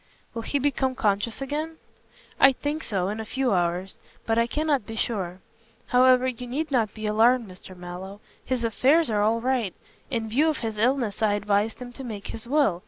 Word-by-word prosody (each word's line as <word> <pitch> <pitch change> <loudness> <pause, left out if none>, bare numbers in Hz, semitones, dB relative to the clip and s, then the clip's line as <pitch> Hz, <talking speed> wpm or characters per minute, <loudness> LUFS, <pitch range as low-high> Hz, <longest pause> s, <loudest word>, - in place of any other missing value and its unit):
"Will 230 - -4
he 285 - -1
become 265 -2 0
conscious 215 +3 0
again?" 305 +4 -3 0.6
"I 270 0 +7
think 295 +4 -3
so, 190 -3 -1
in 215 +2 -4
a - - -3
few 255 +1 0
hours, 180 +1 -1 0.3
but 225 0 +2
I 230 - +2
cannot 290 -3 0
be 225 - -6
sure. 190 -6 -2 0.5
However, 255 0 +5
you 250 -1 -4
need 295 +5 -3
not 230 -6 +1
be 215 0 -6
alarmed, 225 +3 +3
Mr. 185 0 -12
Mallow. 180 +3 -8 0.2
His 255 -2 -2
affairs 265 +6 +3
are 210 -1 +2
all 225 +2 +2
right. 245 -6 0 0.3
In 230 -4 -2
view 280 +9 +3
of 305 - -1
his 220 -2 -4
illness 235 -3 +1
I 215 -2 +3
advised 205 +1 0
him 245 -1 -8
to 270 - -8
make 215 -5 -6
his 225 +1 -5
will. 275 - +2
230 Hz, 195 wpm, -25 LUFS, 205-260 Hz, 0.6 s, I